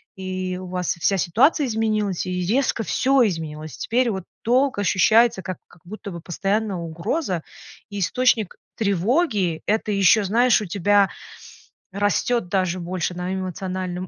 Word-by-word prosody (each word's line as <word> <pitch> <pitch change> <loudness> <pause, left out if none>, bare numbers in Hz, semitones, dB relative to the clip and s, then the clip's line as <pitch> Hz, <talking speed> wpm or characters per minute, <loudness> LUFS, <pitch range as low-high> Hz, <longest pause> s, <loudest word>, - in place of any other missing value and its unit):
и 185 -1 -4
у 185 - -7
вас 180 -1 -1
вся 195 +4 +2
ситуация 260 - +3
изменилась, 215 -4 -1
и 180 -1 -2
резко 235 +3 +1
всё 260 +3 +3
изменилось. 155 -3 -5
Теперь 245 +1 +1
вот 190 -3 -4 0.2
долг 255 +1 +2
ощущается 215 +3 +4
как, 185 -1 -5
как 175 - -21
будто 205 +2 -8
бы 170 -2 -7
постоянная 195 +4 -1
угроза 170 - -3 0.5
и 205 - -4
источник 225 +1 +1 0.2
тревоги. 200 - +1
Это 215 0 0
ещё, 200 +2 +4
знаешь, 230 +5 +3
у 210 - -4
тебя 200 +2 +2 0.8
растет 205 +2 0
даже 185 -2 0
больше 180 0 -3
на 180 +1 -4
эмоциональном 185 -1 -4
195 Hz, 140 wpm, -22 LUFS, 180-225 Hz, 0.8 s, ощущается